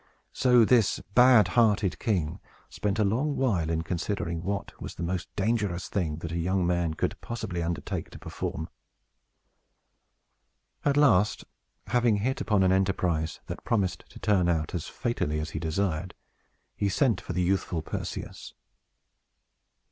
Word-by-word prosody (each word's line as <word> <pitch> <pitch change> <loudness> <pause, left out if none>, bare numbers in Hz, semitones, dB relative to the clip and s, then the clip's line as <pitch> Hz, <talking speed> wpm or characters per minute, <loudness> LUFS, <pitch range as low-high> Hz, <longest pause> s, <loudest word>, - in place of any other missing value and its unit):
So 125 -3 +5
this 115 -3 +3
bad 125 -2 +6
hearted 105 -5 +2
king 85 -8 -1 0.3
spent 105 0 -2
a 110 - +3
long 130 +9 +1
while 95 -12 +1
in 80 0 0
considering 85 -1 -2
what 100 +3 -4
was - - -6
the - - -5
most 85 0 -3
dangerous 100 -4 -1
thing 85 -6 -1
that 85 - -4
a 85 - -2
young 90 +2 +1
man 85 -2 0
could - - -2
possibly 110 -7 -4
undertake 85 -3 -3
to - - -11
perform. 80 +2 -5 2.2
At 145 0 +2
last, 105 -9 +4 0.4
having 120 0 +2
hit 120 +6 -1
upon 105 -4 +2
an 95 - +4
enterprise 90 -4 0
that - - -7
promised 100 -6 0
to - - -13
turn 95 -5 +2
out 80 -2 0
as 85 -4 -3
fatally 115 - -2
as 75 +1 -4
he 80 - -4
desired, 85 +1 -2 0.6
he 100 - 0
sent 110 -3 +2
for - - -5
the 90 - +1
youthful 90 -3 0
Perseus. - - -6
95 Hz, 150 wpm, -28 LUFS, 85-110 Hz, 2.2 s, bad